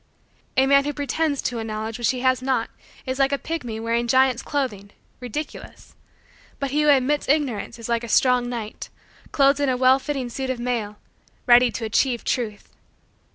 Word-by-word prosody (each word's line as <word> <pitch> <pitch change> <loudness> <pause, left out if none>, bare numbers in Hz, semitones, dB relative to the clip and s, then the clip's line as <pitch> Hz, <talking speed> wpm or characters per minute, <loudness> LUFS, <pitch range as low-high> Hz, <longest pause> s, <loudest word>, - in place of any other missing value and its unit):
A 265 - +5
man 280 +1 +4
who 290 - -2
pretends 290 +1 -1
to 240 -2 -2
a - - -3
knowledge 220 +1 -5
which 240 - +1
he 255 -1 -1
has 255 0 +2
not 260 0 -1 0.3
is 260 0 -3
like 275 0 +3
a 280 - +1
pygmy 250 -9 -5
wearing 230 +1 -1
giant's 260 0 +3
clothing, 220 -9 -3 0.3
ridiculous: 260 +5 -7 0.7
but 275 -2 -2
he 300 +2 +1
who 300 - +3
admits 285 +1 +2
Ignorance 270 -10 0
is 230 - -7
like 235 0 0
a - - -5
strong 250 +1 +3
knight, 225 -3 -6 0.4
clothed 275 0 +3
in 285 -2 +1
a 255 - +1
well 260 +1 +5
fitting 275 -2 -3
suit 265 +2 -4
of 260 - -1
mail, 230 -4 -3 0.5
ready 245 0 +6
to 230 - -4
achieve 240 +2 +1
truth. 215 -5 -3
255 Hz, 185 wpm, -23 LUFS, 235-275 Hz, 0.7 s, ready